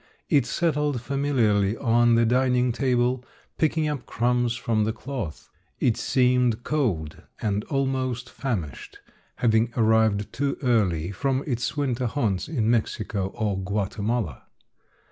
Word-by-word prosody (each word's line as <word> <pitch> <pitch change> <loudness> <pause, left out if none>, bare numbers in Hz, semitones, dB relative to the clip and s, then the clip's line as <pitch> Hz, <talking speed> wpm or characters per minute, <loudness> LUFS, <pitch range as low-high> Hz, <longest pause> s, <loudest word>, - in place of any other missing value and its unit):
It 135 -4 +3
settled 150 -2 0
familiarly 120 -6 +1
on 120 -1 +3
the 115 0 +4
dining 125 +1 +2
table, 125 0 +1 0.4
picking 160 0 +2
up 145 -5 -4
crumbs 120 0 +1
from 115 -2 0
the 110 - 0
cloth. 115 - -6 0.3
It 115 - +2
seemed 125 -2 +2
cold 100 - -1 0.2
and 105 -1 -1
almost 130 -3 -1
famished, 100 - -4 0.4
having 115 0 +2
arrived 110 -2 +2
too 140 0 -1
early 95 -9 +1
from 135 +7 -1
its 125 0 -2
winter 130 -3 0
haunts 110 -7 -1
in 125 -9 -1
Mexico 105 -4 0
or 105 -4 -1
Guatemala. 100 - -2
120 Hz, 125 wpm, -25 LUFS, 110-130 Hz, 0.4 s, the